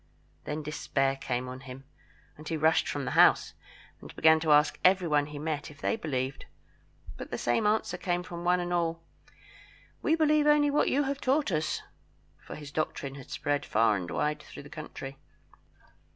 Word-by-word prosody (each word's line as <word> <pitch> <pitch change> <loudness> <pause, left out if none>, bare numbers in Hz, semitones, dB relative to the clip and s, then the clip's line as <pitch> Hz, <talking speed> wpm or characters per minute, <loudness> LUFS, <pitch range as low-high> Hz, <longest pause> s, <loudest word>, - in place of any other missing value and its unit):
Then 150 +1 -4
despair 135 -2 -1
came 125 -2 -3
on 130 +1 -7
him, 135 0 -10 0.5
and 155 +1 -12
he 165 - -1
rushed 160 +1 +3
from 145 -2 -3
the - - -3
house, - - +5 0.5
and - - -12
began 160 0 +5
to 155 -1 0
ask 150 +1 +4
every 185 -1 +4
one 145 -2 +2
he 150 -1 -8
met 150 0 -3
if 150 - -15
they - - 0
believed. 135 - -3 0.7
But - - -8
the - - -3
same 120 - +1
answer 210 -4 0
came 175 -1 -1
from 175 -1 -7
one 180 +1 +3
and 175 0 -2
all 165 -1 -1 1.0
"We 315 - +2
believe 305 -2 +3
only 295 -1 +4
what 290 - +2
you 285 - +2
have 275 0 -3
taught 275 -2 +1
us," 155 -1 -1 0.6
for - - -10
his 145 -1 -9
doctrine 145 -2 -3
had 135 -2 -11
spread 145 -1 -1
far 110 -1 +2
and 90 -3 -4
wide 150 - -1
through - - -11
the 145 - -12
country. 135 -3 -8
155 Hz, 185 wpm, -29 LUFS, 140-180 Hz, 1.0 s, house